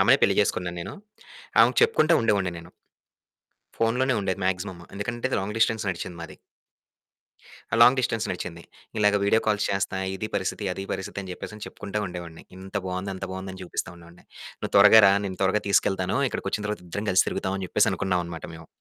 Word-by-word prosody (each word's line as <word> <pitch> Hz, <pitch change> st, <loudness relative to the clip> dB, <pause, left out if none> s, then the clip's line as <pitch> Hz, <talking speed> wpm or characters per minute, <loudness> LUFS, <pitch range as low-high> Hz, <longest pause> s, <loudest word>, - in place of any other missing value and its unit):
ఆమెనే -, -, +6 dB
పెళ్లి -, -, +4 dB
చేసుకున్నాను 90 Hz, -1 st, -1 dB
నేను. -, -, -6 dB, 0.7 s
ఆమెకు -, -, +4 dB
చెప్పుకుంట 310 Hz, -, +4 dB
ఉండేవాడిని 100 Hz, -5 st, +1 dB
నేను. 80 Hz, -, -12 dB, 1.1 s
ఫోనులోనే 125 Hz, +4 st, +1 dB
ఉండేది 95 Hz, -1 st, -2 dB
మాక్సిమం. 95 Hz, -1 st, -3 dB, 0.2 s
ఎందుకంటే 120 Hz, +5 st, -3 dB
లాంగ్ 105 Hz, +3 st, -4 dB
డిస్టెన్స్ 110 Hz, -2 st, +2 dB
నడిచింది 85 Hz, 0 st, -5 dB
మాది. 85 Hz, -, -9 dB, 1.4 s
ఆ! -, -, +4 dB
లాంగ్ 125 Hz, +3 st, +7 dB
డిస్టెన్స్ 115 Hz, -2 st, -1 dB
నడిచింది. 85 Hz, -2 st, -6 dB, 0.3 s
ఇలాగ 105 Hz, -1 st, +4 dB
వీడియో 105 Hz, +3 st, +4 dB
కాల్స్ 105 Hz, -1 st, +2 dB
చేస్తా, 100 Hz, -1 st, -1 dB, 0.2 s
ఇది 110 Hz, +3 st, -4 dB
పరిస్థితి, 100 Hz, +2 st, -2 dB
అది 95 Hz, -, -6 dB
పరిస్థితి, 95 Hz, -, -5 dB
అని 95 Hz, -1 st, -7 dB
చెప్పేసని 110 Hz, +3 st, -8 dB
చెప్పుకుంటా 105 Hz, +1 st, -5 dB
ఉండేవాడిని. 85 Hz, -2 st, -8 dB
ఇంత 95 Hz, +2 st, -11 dB
బావుంది, 95 Hz, +2 st, -3 dB
అంత 95 Hz, -, -5 dB
బావుందని 95 Hz, 0 st, -7 dB
చూపిస్తా 90 Hz, -, -4 dB
ఉండేవాడిని. 85 Hz, 0 st, -17 dB, 0.3 s
"నువ్వు -, -, -5 dB
త్వరగా 105 Hz, +2 st, +9 dB
రా, 95 Hz, -, +6 dB
నేను 95 Hz, -2 st, -5 dB
త్వరగా 105 Hz, +2 st, +2 dB
తీసుకెళ్తాను. 95 Hz, +1 st, +2 dB
ఇక్కడికొచ్చిన 105 Hz, -3 st, -3 dB
తర్వాత 105 Hz, -4 st, -4 dB
ఇద్దరం 100 Hz, +5 st, -4 dB
కలిసి 90 Hz, -, +4 dB
తిరుగుదాం." 95 Hz, +1 st, -2 dB
అని 95 Hz, -, -3 dB
చెప్పేసనుకున్నావనమాట 90 Hz, -4 st, 0 dB
మేము. 80 Hz, 0 st, -12 dB
95 Hz, 165 wpm, -25 LUFS, 90-105 Hz, 1.4 s, త్వరగా